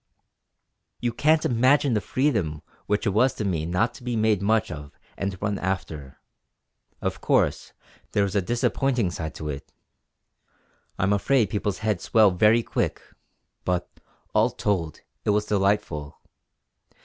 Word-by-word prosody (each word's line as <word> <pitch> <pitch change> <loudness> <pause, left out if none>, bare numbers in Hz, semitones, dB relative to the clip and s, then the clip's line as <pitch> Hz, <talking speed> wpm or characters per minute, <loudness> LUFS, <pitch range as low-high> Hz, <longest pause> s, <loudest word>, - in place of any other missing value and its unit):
"You 120 -1 -1
can't 155 +5 +3
imagine 130 +3 +3
the 105 - +1
freedom 100 - 0 0.2
which 105 +2 0
it 100 - +2
was 125 +6 +3
to 105 - -3
me 80 -5 -1
not 90 +7 +1
to - - -13
be 120 -1 -2
made 110 -3 +2
much 110 0 +1
of 75 -3 -9 0.2
and 100 -2 -3
run 100 0 -1
after. 80 -7 -4 0.8
Of - - -2
course - - +1 0.4
there 100 - +3
was 100 0 -2
a 100 - +3
disappointing 120 0 0
side 80 -2 -5
to 75 - -5
it; 70 -1 -7 1.3
I'm 95 +2 +2
afraid 110 0 +2
people's 105 -1 -1
heads 105 -5 0
swell 110 -3 +5
very 110 +5 +4
quick! - - -1 0.6
But, 90 -1 -1 0.5
all - - +4
told, 85 -7 -2 0.2
it - - -1
was 105 0 +2
delightful. 95 -8 0
105 Hz, 145 wpm, -25 LUFS, 90-115 Hz, 1.3 s, swell